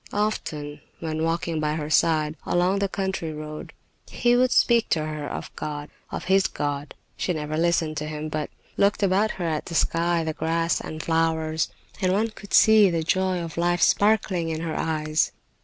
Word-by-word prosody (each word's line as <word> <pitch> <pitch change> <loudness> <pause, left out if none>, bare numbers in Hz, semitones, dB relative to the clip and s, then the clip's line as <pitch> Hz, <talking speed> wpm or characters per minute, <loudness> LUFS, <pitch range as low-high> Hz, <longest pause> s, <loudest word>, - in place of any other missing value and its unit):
Often, 150 -8 -2 0.2
when 160 -1 -3
walking 165 0 -1
by 150 0 0
her 155 -1 -4
side, 155 -1 +3
along 180 +3 +1
the 200 -1 0
country 190 -4 -2
road, 155 0 -7 0.4
he 240 0 +2
would 250 0 +3
speak 235 -2 +4
to 155 -2 +1
her 155 -1 -4
of - - -6
God, 150 -1 -5 0.2
of - - -5
his 190 +1 +3
God. 145 0 -4 0.2
She 180 - -1
never 155 -1 -3
listened 165 -1 +1
to 150 0 -3
him, 155 0 -4
but 155 -1 -3 0.3
looked 200 +1 +2
about 200 +3 +3
her 175 - -3
at 155 -2 -2
the 165 - -5
sky, 170 +1 +2
the 160 -1 -2
grass 165 +1 0
and 155 0 -6
flowers, 160 -1 0 0.3
and 185 -1 +2
one 215 +4 +1
could 210 -2 -4
see 220 -2 +7
the 165 -2 -1
joy 185 +1 +1
of 165 -1 -7
life 175 +1 +2
sparkling 200 -5 +2
in 160 0 -3
her 165 -1 -3
eyes. 155 -1 0
165 Hz, 185 wpm, -25 LUFS, 155-190 Hz, 0.4 s, see